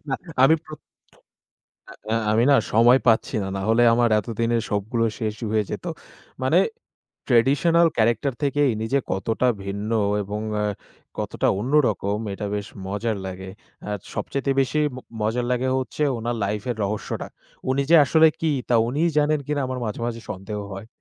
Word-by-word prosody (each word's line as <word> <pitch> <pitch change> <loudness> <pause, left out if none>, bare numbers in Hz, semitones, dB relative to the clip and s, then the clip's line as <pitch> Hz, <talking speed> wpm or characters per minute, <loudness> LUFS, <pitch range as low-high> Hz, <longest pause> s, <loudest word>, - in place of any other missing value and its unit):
না 135 - 0 0.3
আমি 145 +4 +7
প্র 155 - -13 1.4
আ - - +2 0.2
আমি 110 +2 +3
না - - +7 0.2
সময় 120 +4 +6
পাচ্ছি 115 -1 +3
না। - - -4
নাহলে 110 +5 +2
আমার 120 0 +3
এতদিনে 115 +2 -1
সবগুলো 110 +3 0
শেষ 110 -2 -2 0.2
হয়ে 110 -1 +2
যেত। - - -5 0.6
মানে - - +4 0.7
ট্র্যাডিশনাল 145 +7 +4
ক্যারেক্টার 115 +4 +2
থেকে 145 +1 +1
ইনি 110 +1 -3
যে 140 - +4
কতটা 110 +6 0 0.2
ভিন্ন 100 +3 -4 0.3
এবং 105 +2 -4 0.2
এ - - +1 0.5
কতটা - - -1
অন্যরকম 110 -6 +1 0.2
এটা 100 +1 -4
বেশ 100 -1 -4 0.2
মজার 105 +2 -2
লাগে। 95 0 -7 0.4
আর 105 - -2 0.2
সবচাইতে 140 0 -2
বেশি 135 +3 0 0.2
ম - - -8 0.2
মজার 115 +3 0
লাগে 125 +1 0
হচ্ছে 130 +3 -2
উনার 115 +1 -3
লাইফ 105 +1 -3
এর 120 - -5
রহস্যটা। 105 +1 -4 0.4
উনি 140 +1 +1
যে 170 - +7
আসলে 160 +4 +5
কি 160 -2 +1 0.2
তা 120 - +4
উনি 140 +6 -1 0.2
জানেন 150 0 +3
কিনা 145 -1 0
আমার 130 -1 -4
মাঝে, 105 - -4
মাঝে 115 -1 -5
সন্দেহ 105 +1 -6
হয়। 100 +3 -8
115 Hz, 160 wpm, -23 LUFS, 105-135 Hz, 1.4 s, আমি